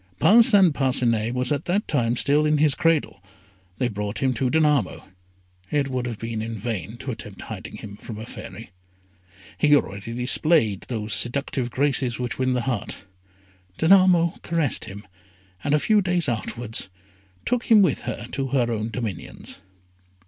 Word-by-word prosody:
Parcin 205 - +6
Parcinet 125 -5 +1
was 125 +1 0
at 145 0 -1
that 195 +4 0
time 120 -5 +1
still 145 +4 +2
in 150 0 +2
his 150 -1 +3
cradle. 160 - 0 0.6
They 125 - +1
brought 105 -1 -4
him 130 -1 +1
to 125 +2 0
Danamo. 150 -7 +1 0.7
It 145 -2 0
would 125 -1 -2
have 115 -3 -5
been 115 0 -4
in 115 +1 -4
vain 110 -1 -4
to 130 +1 -5
attempt 105 -4 -9
hiding - - -8
him 100 -1 -9
from 110 0 -8
a 110 - -7
Fairy. - - -10 0.9
He 150 -1 +5
already 100 -3 -2
displayed 125 - +2
those 110 -3 -3
seductive 130 0 0
graces 130 -2 0
which 125 0 -3
win 130 0 +1
the 125 - 0
heart. 120 -4 -3 0.7
Danamo 175 -1 +4
caressed 165 -8 -1
him, 100 +2 -9 0.6
and 145 +1 +2
a - - +3
few 215 +5 +3
days 175 -4 0
afterwards 115 -3 -4 0.6
took 245 -1 0
him 220 -4 +6
with 185 - +1
her - - -5
to 135 -1 -2
her 125 -3 +1
own 110 0 -2
dominions. 115 -6 -6
130 Hz, 160 wpm, -24 LUFS, 115-150 Hz, 0.9 s, Parcin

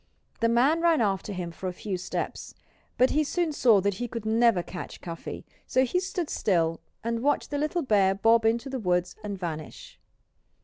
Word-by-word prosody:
The 230 - +2
man 270 +8 +3
ran 335 -2 +4
after 200 -2 0
him 180 -3 -4
for 185 +3 -5
a - - -6
few 195 +1 -4
steps. 180 - -5 0.4
But 255 +1 +4
he 305 - +2
soon 335 +2 -1
saw 230 -8 +4
that 200 +1 +1
he 245 - -1
could 230 -2 -6
never 225 -4 +3
catch 180 - -8
Cuffy. 165 -2 -7 0.2
So 260 0 +3
he 360 +8 0
stood 365 -3 -3
still 165 - 0 0.2
and 230 0 -1
watched 290 +3 0
the 290 - -1
little 310 +3 0
bear 200 -6 +3
bob 225 +3 +4
into 230 +4 +1
the 265 -1 -4
woods 180 -3 0
and 205 -2 -4
vanish. 160 -4 -7
225 Hz, 190 wpm, -27 LUFS, 185-265 Hz, 0.4 s, ran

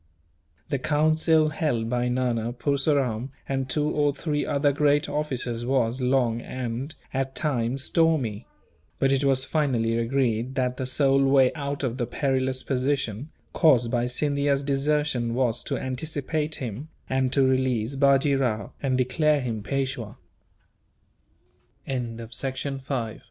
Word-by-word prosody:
The 140 - 0
council 155 +2 +3
held 145 -8 -1
by 125 +1 0
Nana, 120 -2 0
Purseram, 135 -3 0 0.2
and 135 -1 -2
two 150 +2 0
or 145 -2 +1
three 150 0 -1
other 145 0 +2
great 145 +1 +2
officers 130 -5 -2
was 125 -1 0
long 125 -2 +1
and, 130 +5 -5 0.2
at 135 0 -2
times, 130 -3 -1
stormy; 140 -12 +1 0.5
but 135 - +2
it 135 0 +2
was 135 -1 +2
finally 125 -8 +1
agreed 120 0 0
that 125 -1 0
the 130 - -3
sole 135 +1 +3
way 135 -1 +4
out 140 -2 -4
of 130 0 -2
the 120 - -1
perilous 130 0 -1
position, 135 -1 -1 0.2
caused 125 -8 +4
by 120 0 +1
Scindia's 140 +2 0
desertion, 140 -4 0
was 120 -3 +1
to - - -2
anticipate 150 +3 -2
him 125 +4 -6 0.2
and 130 -1 0
to 135 0 +3
release 130 -2 +1
Bajee 140 0 +3
Rao, 115 -5 -1
and 130 -2 +1
declare 145 +4 +2
him 115 -5 -3
Pe 135 +5 -1
135 Hz, 130 wpm, -25 LUFS, 125-145 Hz, 0.5 s, way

